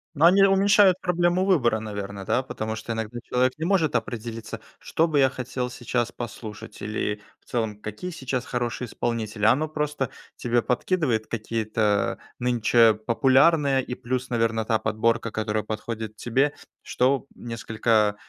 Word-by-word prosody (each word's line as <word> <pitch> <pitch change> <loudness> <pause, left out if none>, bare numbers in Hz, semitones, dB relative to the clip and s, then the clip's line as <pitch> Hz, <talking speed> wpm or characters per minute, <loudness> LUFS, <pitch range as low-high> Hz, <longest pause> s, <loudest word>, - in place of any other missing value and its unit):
Но 150 - +4
они 195 +2 +5
уменьшают 195 -1 +5
проблему 175 +1 +2
выбора, 125 - +3
наверное, 100 -2 -6
да. 125 - +2
Потому 110 -4 -4
что 115 +1 -4
иногда 110 +2 -4
человек 125 +1 +1
не 160 - -3
может 175 -5 +2
определиться. 115 -1 -4 0.2
"Что 165 +1 +1
бы 145 -2 +2
я 135 -1 +5
хотел 125 -1 -4
сейчас 120 -1 -2
послушать" 115 -3 -8
или 105 0 -2 0.2
в - - -36
целом 110 -3 -3
"какие 110 - -6
сейчас 130 -5 -3
хорошие 120 0 -2
исполнители". 110 -2 -3
А 110 - +7
оно 155 +4 +1
просто 150 -4 -2 0.3
тебе 120 0 +1
подкидывает 125 -3 0
какие-то 110 -2 0 0.2
нынче 120 -2 +4
популярные 135 +5 +3
и 125 - -5
плюс, 130 +1 -3
наверно, 115 -2 +1
та 110 0 +1
подборка, 115 +1 0
которая 110 0 -1
подходит 110 0 -5
тебе, 135 +6 +1 0.3
что 130 +2 +1
несколько 110 -2 0
120 Hz, 150 wpm, -25 LUFS, 110-135 Hz, 0.3 s, А